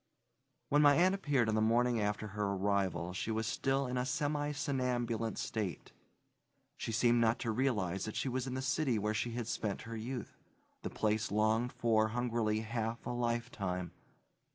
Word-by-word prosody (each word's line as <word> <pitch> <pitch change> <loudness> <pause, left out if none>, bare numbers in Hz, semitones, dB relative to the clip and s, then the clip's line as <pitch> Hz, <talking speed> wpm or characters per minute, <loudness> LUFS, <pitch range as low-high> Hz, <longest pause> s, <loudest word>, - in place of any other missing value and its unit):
When 145 +1 +4
my 145 -1 +7
aunt 185 +4 +4
appeared 145 - +1
on 110 - +1
the 110 - +2
morning 120 +2 +3
after 105 +1 -1
her 105 +1 -3
arrival 95 -3 0
she 95 - -3
was 110 0 0
still 135 +4 0
in 125 0 -1
a 125 - 0
semi 145 +1 0
somnambulant 125 -5 -1
state. 105 -5 -3 0.8
She - - -4
seemed 120 +1 +3
not 115 +1 +3
to 115 - 0
realize 105 -7 0
that 110 - -5
she - - -1
was 130 0 -1
in 130 - -3
the 130 - -2
city 140 -3 +1
where 105 +1 0
she 115 +2 -1
had 120 -1 -3
spent 105 -2 -3
her 115 0 -6
youth, 120 +1 -5 0.4
the - - -4
place 110 0 0
longed 110 +3 +2
for 115 -3 +2
hungrily 115 -2 0
half 115 +1 -3
a - - -2
lifetime. 115 -7 -2
115 Hz, 175 wpm, -34 LUFS, 110-125 Hz, 0.8 s, my